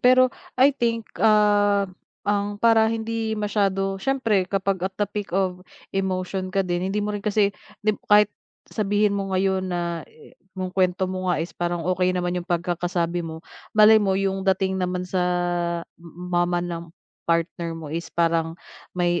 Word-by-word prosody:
pero 255 0 +5 0.2
I 270 +3 +6
think, 230 -4 -1 0.2
ah, 205 -2 +4 0.4
ang 205 0 0
para 225 0 +5
hindi 225 0 -2
masyado 195 -2 0
siyempre 225 -8 +1
kapag 195 -1 0
at 190 0 -3
the 205 - +3
peak 205 0 -5
of 185 -2 0 0.3
emotion 185 0 -2
ka 195 - -1
din 175 0 -1
hindi 205 - -1
mo 210 0 -1
rin 205 - -4
kasi 205 -1 +2 0.3
di 215 - +4 0.2
kahit 210 0 +7 0.4
sabihin 205 0 +1
mo 195 -1 -2
ngayon 190 0 0
na 170 -2 -2
yu 155 - -18 0.2
yung 185 0 -4
kwento 185 0 +2
mo 185 0 -2
nga 175 - +1
is 165 +2 -4
parang 175 -1 -2
okey 185 0 +2
naman 180 -1 -1
yung 175 - -21
pagkakasabi 175 0 -1
mo, 160 -1 -7 0.3
malay 215 +1 +8
mo 190 -2 +1
yung 195 0 0
dating 190 0 +1
naman 180 0 -1
sa 180 0 0 0.8
m 170 - -12 0.2
mama 175 0 +2
ng 170 -1 -5 0.4
partner 170 0 0
mo 155 -2 -7
is 170 +1 -4
parang 165 -1 +1 0.4
may 175 -1 +1
190 Hz, 165 wpm, -24 LUFS, 175-205 Hz, 0.8 s, malay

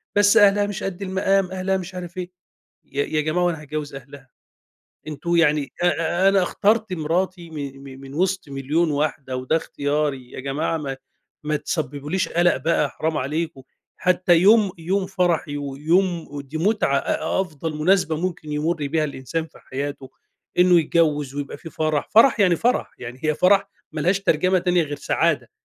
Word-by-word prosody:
بس 205 +2 +5
أهلها 205 -1 +5
مش 205 -1 -5
قد 195 -1 -4
المقام، 190 0 +1
أهلها 190 +1 -1
مش 185 0 -7
عارف 175 -1 -7
إيه، 180 0 -5 0.5
يا 140 +1 -2
يا 155 - 0
جماعة 155 +4 0
هو 175 - +3
أنا 160 -3 -4
هاتجوز 150 -1 -5
أهلها؟ 135 -1 -12 0.8
أنتم 155 +3 -2
يعني 150 -4 +2
أ 175 - +3
أ 175 +2 +2
أنا 195 -1 +4
اخترت 210 +3 +1
مرَاتي 175 +1 -2
من 140 -3 -6 0.2
م - - -14
من 135 0 -10
وسط 185 +1 0
1.000.000 145 +5 0
واحدة، 145 -3 -2
وده 130 +5 0
إختياري، 145 -4 -2
يا - - -7
جماعة 145 +5 -2
ما 135 -3 -4 0.5
ما 150 0 0
تسببوليش 150 +3 -2
قلق 175 +1 +3
بقى 150 +2 +1
حرام 160 0 -2
عليكم، 150 0 -3 0.3
حتّى 180 -1 +3
يوم 205 +2 +5
يوم 185 +4 -1
فرحي، 175 -6 0
ويوم 160 +5 0
ودي 145 +1 -6
مُتعة 190 -6 +2
أ - - -1
أفضل 160 -3 -4
مُناسبة 165 0 +2
ممكن 165 -2 -4
يمُر 155 +3 0
بيها 155 +2 +1
الإنسان 150 +3 -4
في 160 - -19
حياته، 140 0 -6 0.5
إنه 180 -1 +6
يتجوز 150 -4 +1
ويبقى 145 -1 -5
في 165 - -10
فرح، 155 -2 -1
فرح 230 +1 +5
يعني 180 -4 +4
فرح، 245 +6 0
يعني 125 +1 -8
هي 155 - +2
فرح 195 +4 +3 0.2
ما 155 - -4
لهاش 180 +5 +2
ترجمة 185 0 +2
تانية 180 -1 +2
غير 145 -2 -4
سعادة، - - 0
165 Hz, 170 wpm, -22 LUFS, 145-185 Hz, 0.8 s, إنه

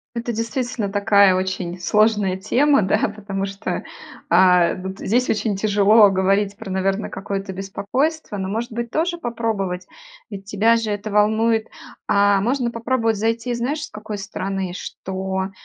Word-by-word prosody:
Это 235 0 -3
действительно 230 -1 -2
такая 200 -1 +4
очень 185 -1 -3
сложная 210 0 +2
тема, 275 +9 +2
да, 190 - +2 0.2
потому 195 -2 -4
что, 195 +1 -4 0.5
а, 180 0 +5
вот 190 +2 -7
здесь 245 +5 +1
очень 215 -1 0
тяжело 205 +1 +5
говорить 195 +1 +1
про, 225 - -8
наверно, 195 +2 -1
какое-то 195 0 -5
беспокойство, 205 - -2
но, 190 -1 -3
может 225 +2 -3
быть, 235 0 -4
тоже 345 +2 0
попробовать, 215 - -3 0.4
ведь 200 -2 -8
тебя 215 +3 +3
же 225 -2 -1
это 205 +1 -4
волнует. 220 +2 +2 0.4
А 200 -1 +4
можно 245 +2 0
попробовать 230 -1 0
зайти, 230 +3 -1
знаешь, 265 +6 -2
с - - -15
какой 210 0 -7
стороны? 195 -2 -4
Что 190 0 -4
205 Hz, 145 wpm, -21 LUFS, 195-230 Hz, 0.5 s, а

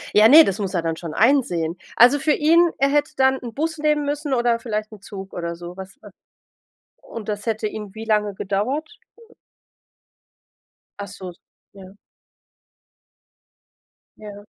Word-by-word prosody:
Ja, 215 +1 +7
ne, 310 +6 +9
das 195 +2 -2
muss 195 -1 -3
er 170 - 0
dann 165 -1 -2
schon 165 -2 -8
einsehen. 195 - +1 0.2
Also 250 +5 +6
für 300 +1 +2
ihn 335 +4 +4
er 275 0 +2
hätte 295 +1 0
dann 265 0 +3
'n 235 -3 -8
Bus 320 +2 -3
nehmen 300 -1 +1
müssen 290 0 -3
oder 240 -1 +1
vielleicht 215 -2 -4
'n 210 -3 -13
Zug 195 -1 -10
oder 170 -1 -4
so 175 +1 -10
was 190 0 -11
wa - - -13 0.9
Und 220 -2 -9
das 205 -1 -4
hätte 220 -1 -2
ihm 210 -2 -7
wie 220 0 -8
lange 210 -2 +1
gedauert? 210 +12 -3 2.0
Ach 200 - -6
so, 190 -2 -9 0.4
ja. 190 -1 -13 2.2
Ja. 205 -1 -11
215 Hz, 150 wpm, -21 LUFS, 195-275 Hz, 2.2 s, ne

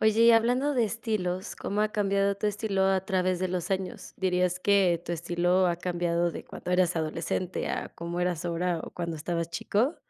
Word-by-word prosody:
Oye, 220 0 +3
y 235 - +8
hablando 250 +5 +3
de 240 - +3
estilos, 210 -4 -2
¿cómo 205 +1 -2
ha 215 - +3
cambiado 200 -1 +1
tu 210 - -1
estilo 205 -1 0
a 190 -1 +2
través 185 -2 +1
de 185 - -1
los 180 0 -3
años? 190 -1 -3
¿Dirías 180 -1 +1
que 185 -4 +3
tu 175 - -3
estilo 175 +2 +1
ha 175 -1 +1
cambiado 175 -1 0
de - - -8
cuando - - -7
eras 180 -1 +2
adolescente 165 +3 -2
a - - -3
como 170 +1 -4
eras 175 -1 -1
ahora, 175 0 -1
o, - - -7
cuando 170 -2 -4
estabas 170 +2 -2
chico? 215 - 0
180 Hz, 195 wpm, -28 LUFS, 175-200 Hz, -, y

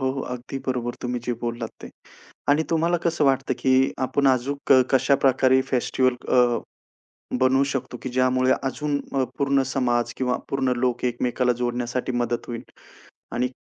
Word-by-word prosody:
हो, 130 0 +1
हो, 135 - -4
अगदी 125 +2 -5
बरोबर. 120 -2 -2
तुम्ही 125 -1 -2
जे 125 - -1
बोललात 120 -1 -3
ते - - -7 0.6
आणि 145 +2 +4
तुम्हाला 165 +2 +2
कसं 165 -3 +1
वाटतं 135 -1 +2
की 130 0 +3
आपण 140 +1 +1
अजून 135 +2 +1 0.2
कशाप्रकारे 130 0 +3
फेस्टिव्हल 130 0 +2
अ, 120 -2 +4 0.8
बनवू 130 +1 +4
शकतो 125 -2 -4
की 130 - -3
ज्यामुळे 130 0 +2
अजून 145 +2 -1 0.2
अ, 135 -1 +2
पूर्ण 140 -1 +2
समाज 120 -2 +1
किंवा 125 -1 0
पूर्ण 130 -2 0
लोक 125 0 -1
एकमेकाला 125 0 +1
जोडण्यासाठी 120 +1 -2
मदत 120 -1 -1
होईल 120 0 -5 0.7
आणि 125 +1 +1
130 Hz, 150 wpm, -24 LUFS, 125-135 Hz, 0.8 s, आणि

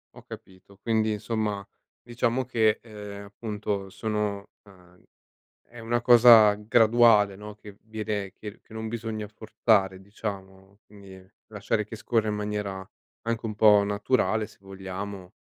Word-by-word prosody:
Ho - - -14
capito. 95 +1 -14
Quindi, 110 -1 +1
insomma, 105 -2 -3 0.4
diciamo 120 +1 -1
che, 110 -4 +1
ehm, 105 -3 -9
appunto, 105 -1 -5
sono 105 -1 -3 0.2
ehm, 90 -2 -20 0.7
è 120 - -13
una 120 +1 -1
cosa 115 -3 +8
graduale, 110 -1 +4
no, 105 0 -10
che 105 -1 -14
viene 105 -3 -4
che 105 - -8
r 105 - -16
che - - -18
non 110 0 -5
bisogna 110 -2 -4
forzare, 105 -3 0
diciamo, 95 -1 -8
quindi, 100 -2 -14 0.3
lasciare 105 0 -2
che 110 - -9
scorra 110 0 -1
in 105 - -1
maniera 105 -2 -4 0.4
anche 115 0 -3
un 110 -1 -4
po' 105 -1 +6
naturale, 105 0 0
se - - -20
vogliamo, 95 -1 -8
105 Hz, 140 wpm, -26 LUFS, 100-110 Hz, 0.7 s, cosa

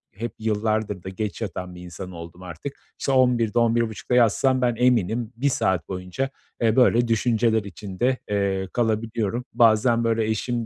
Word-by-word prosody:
hep 115 +2 -4
yıllardır 110 -3 -1
da 95 - -5
geç 105 +4 -4
yatan 90 -4 -5
bir 90 - -10
insan 90 +1 -8
oldum 85 +1 -10
artık. 90 - -7 0.2
İşte, 135 - -1
11.00'de, 120 -3 +3
11.30'da 115 0 +1
yatsam 125 +2 +3
ben, 120 -1 +2
eminim 120 -1 +1
1 140 +4 +1
saat 95 -8 0
boyunca, 95 +8 -3 0.3
eee, 115 -1 +3
böyle 120 -2 +4
düşünceler 115 -1 +2
içinde, 100 +5 -2
eee, 100 -2 0
kalabiliyorum. 115 0 -1
Bazen, 115 +1 +4
böyle, 115 -1 +1
eşim 115 +2 -1
110 Hz, 150 wpm, -24 LUFS, 100-120 Hz, 0.3 s, böyle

